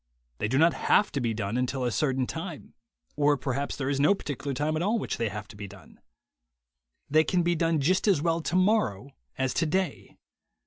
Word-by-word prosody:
They - - 0
do 130 +5 0
not 165 +2 +5
have 200 +9 +2
to 140 - -2
be 120 -2 0
done 105 +2 -2
until 125 +1 -1
a 120 - 0
certain 130 -1 0
time, - - -7 0.4
or 145 0 +3
perhaps 140 +1 -2
there 130 - -3
is 140 0 0
no 150 +8 +4
particular 145 -5 -5
time 150 +4 -1
at 155 - -1
all 205 +6 +1
at - - +1
which - - -3
they 115 -2 -1
have 105 0 -7
to - - -12
be 100 0 -7
done. 95 -5 -15 1.1
They 155 +2 +4
can 175 +1 +1
be 175 +1 +2
done 165 -1 +1
just 185 +9 +1
as 195 -7 +4
well 165 +2 0
tomorrow 175 - +1 0.3
as 130 -1 0
today. 180 +3 -1
145 Hz, 210 wpm, -27 LUFS, 125-165 Hz, 1.1 s, not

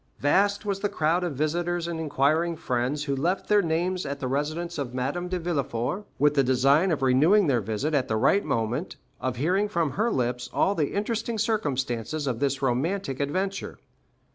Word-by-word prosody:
Vast 200 +8 +2
was 200 -1 -1
the 205 +1 -1
crowd 165 +2 +1
of 170 -5 -2
visitors 170 +4 -1
and 170 -1 -4
inquiring 160 +3 +1
friends 130 0 -1
who 140 -2 -1
left 175 +8 -1
their 210 -1 +4
names 175 +2 -1
at 140 0 -4
the 130 - -3
residence 155 +5 -2
of 125 -3 -4
Madame 145 +8 -2
de 185 0 -2
Villefort, 155 - -2
with 150 0 +3
the 140 -2 +3
design 135 +7 +3
of 155 -5 0
renewing 155 +11 +5
their 130 -6 +2
visit 110 +9 -2
at 135 -3 +1
the 110 - 0
right 200 - +3
moment, 115 - -2 0.2
of 130 -1 -2
hearing 185 - +1
from 170 -7 0
her 220 +4 0
lips 125 - -1
all 195 - +2
the 155 -7 -1
interesting 225 +2 -2
circumstances 145 - -1
of 125 -4 -2
this 140 -1 +1
most 135 - -14
romantic 135 +3 -1
adventure. 190 +7 -2
155 Hz, 190 wpm, -26 LUFS, 135-180 Hz, 0.2 s, renewing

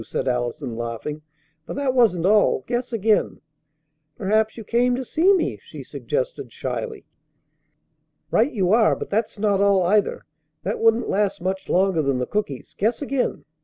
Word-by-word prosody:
said - - -3
Allison, 125 0 -2
laughing. 120 +6 -5 0.5
"But - - -5
that 275 -2 0
wasn't 215 -9 +3
all. 210 +1 +3
Guess 245 +1 -2
again." 220 -1 +1 0.8
"Perhaps 215 +3 +1
you 225 - -7
came 245 +3 +2
to 260 +1 -4
see 340 +10 +3
me," 375 -4 +1
she - - -10
suggested - - -4
shyly. 450 -4 -5 1.3
"Right 245 +6 +3
you 190 -5 0
are! 225 -1 +4
But - - -7
that's 220 +2 -1
not 200 -1 +1
all, 200 -2 +4
either. 205 +4 +1 0.4
That - - -2
wouldn't 225 +1 +3
last 205 -1 0
much 190 +2 -3
longer 185 -2 +2
than 140 -3 0
the 125 - -1
cookies. 145 -10 -4
Guess 225 +8 0
again." 275 -2 -2
210 Hz, 160 wpm, -23 LUFS, 180-240 Hz, 1.3 s, are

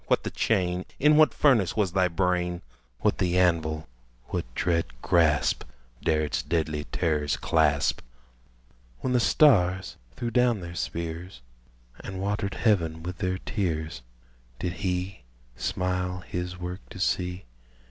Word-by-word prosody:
what - - +2
the - - -3
chain? 90 -4 0
In 150 +2 +5
what 155 0 +6
furnace 115 - +3
was 100 -4 +2
thy 90 0 +3
brain? 90 0 0 0.4
What - - +1
the 90 -1 +1
anvil? 80 -3 +1 0.4
what - - -3
dread 85 -9 -1
grasp 80 -4 +3 0.4
Dare 80 -1 +2
its 75 - -1
deadly 80 -3 -1
terrors 75 -3 0
clasp? 75 -3 +2 1.0
When 130 - 0
the 125 - +4
stars 95 - +4 0.2
threw 120 -1 -3
down 125 -2 +3
their 85 -1 -7
spears, 85 -1 -5 0.6
And 95 -1 -6
watered 100 0 -2
heaven 85 -8 +1
with 90 +1 -6
their 95 0 0
tears, 85 - -3 0.6
Did 90 +5 -2
he 90 0 -2 0.3
smile 90 +4 -2
his 90 0 -5
work 90 +1 -5
to - - -10
see? 90 0 -1
90 Hz, 135 wpm, -27 LUFS, 85-95 Hz, 1.0 s, what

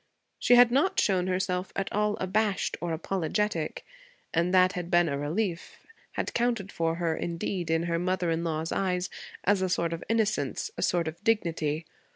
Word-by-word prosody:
She 245 - +5
had 245 -1 +7
not 285 +9 +2
shown 185 -3 +2
herself 185 0 -1
at 195 - -2
all 210 0 +1
abashed 200 +1 0
or 170 -1 -2
apologetic, 170 +1 -2 0.5
and 170 +2 +2
that 185 0 +5
had 175 -1 -4
been 175 -1 +4
a 140 - -1
relief; 170 +5 -3 0.3
had - - -3
counted 235 -5 0
for 165 0 0
her, 170 -2 0
indeed, 170 +1 -3
in 165 0 +2
her 170 -1 0
mother 180 -1 0
in 165 +1 -1
law's 160 -1 -2
eyes, 180 -1 -1 0.3
as 200 0 +3
a 185 - +1
sort 170 -1 0
of 165 - -5
innocence, 225 - 0
a - - -5
sort 170 -2 +1
of 160 +5 -7
dignity. 165 -8 0
180 Hz, 180 wpm, -28 LUFS, 165-200 Hz, 0.5 s, had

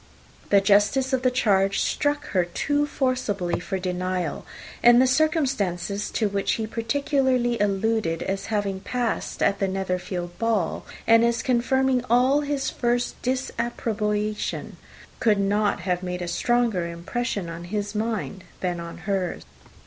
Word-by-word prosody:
The 200 - +5
justice 210 +7 +3
of 260 - +2
the 255 - +3
charge 200 -6 +2
struck 290 0 0
her 185 -3 +2
too 290 +12 0
forcibly 250 -11 -1
for 190 +2 -3
denial; 180 -2 -3 0.3
and 240 0 +7
the 260 - +6
circumstances 255 - 0
to 220 - 0
which 200 -1 0
he 220 - -2
particularly 250 +1 0
alluded, 205 -3 0
as 195 +1 -3
having 205 -3 -1
passed 240 +3 -2
at 195 - +2
the 195 - +1
Netherfield 180 -2 -3
ball, 225 -7 0 0.2
and 230 0 +6
as 235 0 +1
confirming 255 +1 +2
all 255 +5 +4
his 285 -2 -2
first 240 0 -1
disapprobation, 220 -4 -2 0.4
could 215 -4 +3
not 205 0 +1
have 180 0 -1
made 180 -1 -4
a - - -4
stronger 230 -3 +1
impression 185 +3 -3
on 170 +1 -7
his 205 +2 -3
mind 210 -5 -3 0.2
than 180 -2 -1
on 170 0 -7
hers. 195 -4 -1
210 Hz, 140 wpm, -25 LUFS, 190-245 Hz, 0.4 s, and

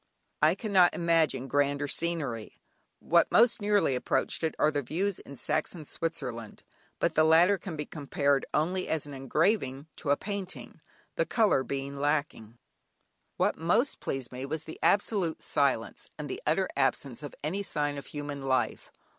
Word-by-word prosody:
I 155 +3 +5
cannot 195 -4 +3
imagine 165 -6 +2
grander 145 +1 +1
scenery; 145 -9 -2 0.4
what - - +3
most 235 -1 +5
nearly 205 -8 +2
approach 125 - 0
it 160 - 0
are 150 - +3
views 160 +8 -1
in 140 - -11
Saxon 160 +4 -2
Switzerland, 125 -10 -5 0.3
but - - +1
the 155 - +4
latter 170 +5 +5
can 175 -2 -6
be 150 -1 -4
compared 140 -2 0
only 180 +5 0
as 160 -2 -1
an 145 - -9
engraving 135 - 0
to 150 - -5
a 145 - +4
painting, 200 -2 -6 0.4
the - - +2
colour 215 - +3
being 140 +2 -4
lacking. 140 -6 -1 0.8
What - - +1
most 215 - +2
impressed 135 -3 -4
me 125 +1 -6
was 150 +3 -3
the 160 - -9
absolute 195 -5 +1
silence, 140 -6 0
and 150 -1 -5
the - - -5
utter 175 +5 +2
absence 135 -2 0
of 145 - -8
any 180 +7 -1
sign 145 -6 -1
of - - -11
human 145 -1 -5
life. 130 -1 -1
150 Hz, 155 wpm, -29 LUFS, 140-175 Hz, 0.8 s, I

